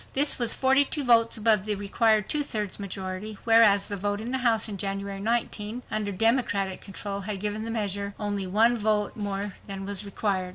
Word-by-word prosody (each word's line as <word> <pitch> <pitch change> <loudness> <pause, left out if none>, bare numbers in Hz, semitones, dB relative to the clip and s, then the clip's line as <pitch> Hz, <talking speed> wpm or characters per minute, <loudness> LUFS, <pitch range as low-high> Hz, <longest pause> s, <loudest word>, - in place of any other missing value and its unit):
This 285 +1 +4
was 235 -2 +5
42 275 +2 +3
votes 230 -2 +4
above 215 -2 +3
the 210 -1 0
required 210 +1 +1
two 300 - 0
thirds 210 -9 -4
majority, 195 +1 -6
whereas 225 -3 +5
the 205 - -3
vote 205 +1 -2
in 230 +3 -5
the 260 - 0
House 235 -3 +2
in 210 - -5
January, 195 0 -4
1918, 225 +1 -2
under 210 -1 -1
Democratic 200 -3 +1
control 200 0 -6
had 200 0 -4
given 210 +2 -3
the - - -4
measure 200 -2 -3
only 205 -2 -2
one 225 +5 +3
vote 210 -1 0
more 205 -1 -4
than 195 -1 -6
was 200 0 -3
required. 195 -2 -2
210 Hz, 190 wpm, -26 LUFS, 200-225 Hz, -, was